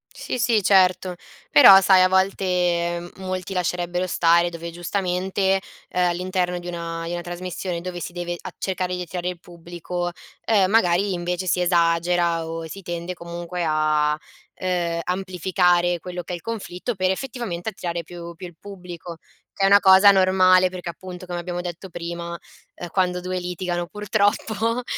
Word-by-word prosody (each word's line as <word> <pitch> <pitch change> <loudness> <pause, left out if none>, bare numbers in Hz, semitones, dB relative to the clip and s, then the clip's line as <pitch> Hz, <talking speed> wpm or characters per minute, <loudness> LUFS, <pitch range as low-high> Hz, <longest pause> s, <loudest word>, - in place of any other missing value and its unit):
Sì, - - -4
sì, 230 -2 +2
certo. 185 -1 +3 0.3
Però 195 +6 +9
sai, 190 -1 +6
a 185 - +6
volte, 190 +1 +1
ehm, 175 -1 0
molti 185 0 -5
lascerebbero 180 0 -1
stare 170 -1 +3
dove 170 0 -6
giustamente, 190 +2 -1 0.3
ehm, 180 -1 +1
all'interno 180 0 -1
di 175 - -9
una 170 -1 -5
di 170 - -4
una 175 - -3
trasmissione 175 0 -5
dove 180 0 -5
si 175 - -6
deve 175 0 -4
a - - -8
cercare 185 -1 -2
di 180 - -4
attirare 180 0 -4
il 180 -1 -6
pubblico, 175 +1 -6 0.3
ehm, 200 -4 +3
magari 195 -2 +3
invece 180 +1 -3
si 180 +1 +1
esagera 170 -1 +2
o 165 0 -5
si 195 +4 -9
tende 175 +1 -5
comunque 170 0 -5
a, 155 -1 +2 0.4
ehm, 175 -2 -1
amplificare 180 -1 +1
quello 180 +1 -6
che 175 - -7
è - - -1
il 170 - -9
conflitto 225 0 -4
per, 185 -2 0
effettivamente, 220 -4 -3
attirare 175 -4 -4
più 170 +1 -9
più 180 - -9
il 175 -2 -11
pubblico, 180 -4 -9 0.4
che 195 - -3
è - - +6
una 200 +1 +7
cosa 190 +1 +8
normale 185 -1 +5
perché 180 -1 -7
appunto, 180 +1 -9
come 175 -1 -4
abbiamo 175 0 -4
detto 175 +1 -7
prima, 170 0 -5 0.4
ehm, 175 - -7
quando 180 0 0
2 185 +1 -3
litigano 175 0 -3
purtroppo, 215 +3 0
180 Hz, 165 wpm, -23 LUFS, 175-185 Hz, 0.4 s, Però